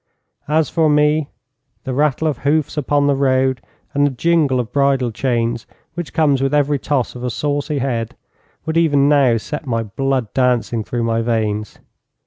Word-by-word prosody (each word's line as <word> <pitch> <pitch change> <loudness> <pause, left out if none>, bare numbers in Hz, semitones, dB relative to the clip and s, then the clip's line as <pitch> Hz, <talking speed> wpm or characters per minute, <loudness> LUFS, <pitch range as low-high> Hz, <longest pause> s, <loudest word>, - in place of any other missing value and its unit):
As 155 0 +2
for 160 -2 +1
me, 150 0 +2 0.6
the 130 - -4
rattle 150 +2 +1
of 145 -5 -2
hoofs 150 +1 0
upon 145 -1 +1
a 140 - +3
road, 130 -1 +1 0.3
and 145 - +2
the - - 0
jingle 145 -1 +1
of 120 -1 -4
bridle 140 -3 +2
chains 115 -1 -1 0.3
which 175 -1 -6
comes 145 -4 +2
with 135 +2 +1
every 145 -1 +2
toss 135 -4 -1
of 125 - -9
a 125 - -1
saucy 145 +3 -2
head, 120 -4 -2 0.5
would 160 +1 -1
even 145 -4 +3
now 140 -5 +4
set 150 +6 -6
my 115 -2 -1
blood 130 +2 -2
dancing 120 -3 +1
through 120 +2 -3
my 115 0 0
veins. 110 -2 -2
135 Hz, 170 wpm, -18 LUFS, 120-150 Hz, 0.6 s, now